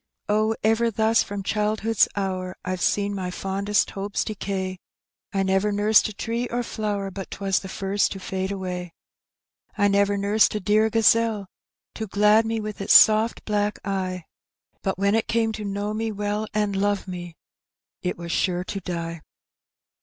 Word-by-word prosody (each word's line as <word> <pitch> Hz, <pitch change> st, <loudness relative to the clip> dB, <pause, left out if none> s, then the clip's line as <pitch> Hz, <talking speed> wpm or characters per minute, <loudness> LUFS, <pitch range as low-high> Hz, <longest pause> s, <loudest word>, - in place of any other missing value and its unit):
Oh, 215 Hz, +1 st, +2 dB
ever 225 Hz, +2 st, +3 dB
thus 220 Hz, +1 st, +3 dB
from 200 Hz, -1 st, -4 dB
childhood's 215 Hz, +1 st, +1 dB
hour 185 Hz, -2 st, -3 dB
Fve 185 Hz, 0 st, -2 dB
seen 205 Hz, 0 st, +1 dB
my 185 Hz, -2 st, -3 dB
fondest 195 Hz, +3 st, 0 dB
hopes 200 Hz, +1 st, -2 dB
decay. 190 Hz, -3 st, -4 dB, 0.5 s
I 195 Hz, -1 st, 0 dB
never 190 Hz, +2 st, +1 dB
nursed 210 Hz, +1 st, +4 dB
a -, -, -8 dB
tree 230 Hz, +4 st, -2 dB
or 245 Hz, +1 st, -2 dB
flower 205 Hz, -4 st, -3 dB
But 195 Hz, 0 st, -7 dB
'twas 195 Hz, -1 st, 0 dB
the 190 Hz, -, -9 dB
first 195 Hz, +1 st, 0 dB
to 190 Hz, 0 st, -7 dB
&Ae 190 Hz, 0 st, 0 dB
away; 180 Hz, -3 st, -5 dB, 0.8 s
I 205 Hz, -, +4 dB
never 200 Hz, 0 st, +2 dB
nursed 205 Hz, +2 st, +3 dB
a -, -, 0 dB
dear 215 Hz, +2 st, +3 dB
gazelle 225 Hz, -1 st, +3 dB, 0.5 s
To 220 Hz, -, -5 dB
glad 210 Hz, +3 st, +4 dB
me 225 Hz, 0 st, -1 dB
with 210 Hz, -1 st, -5 dB
its 195 Hz, -, +3 dB
soft 220 Hz, +2 st, +6 dB
black 210 Hz, 0 st, 0 dB
eye, 185 Hz, -2 st, -2 dB, 0.6 s
But 190 Hz, -, -2 dB
when 200 Hz, +1 st, +2 dB
it 225 Hz, 0 st, +1 dB
came 225 Hz, -1 st, +1 dB
to 215 Hz, -1 st, -6 dB
know 205 Hz, +1 st, -3 dB
me 220 Hz, +1 st, -2 dB
well. 210 Hz, +1 st, -2 dB
And 210 Hz, -2 st, 0 dB
love 200 Hz, 0 st, 0 dB
me, 175 Hz, -2 st, -7 dB, 0.7 s
it 180 Hz, -, -2 dB
was 170 Hz, 0 st, -6 dB
sure 180 Hz, 0 st, 0 dB
to 195 Hz, -, -5 dB
die. 170 Hz, -3 st, -5 dB
205 Hz, 170 wpm, -24 LUFS, 190-215 Hz, 0.8 s, soft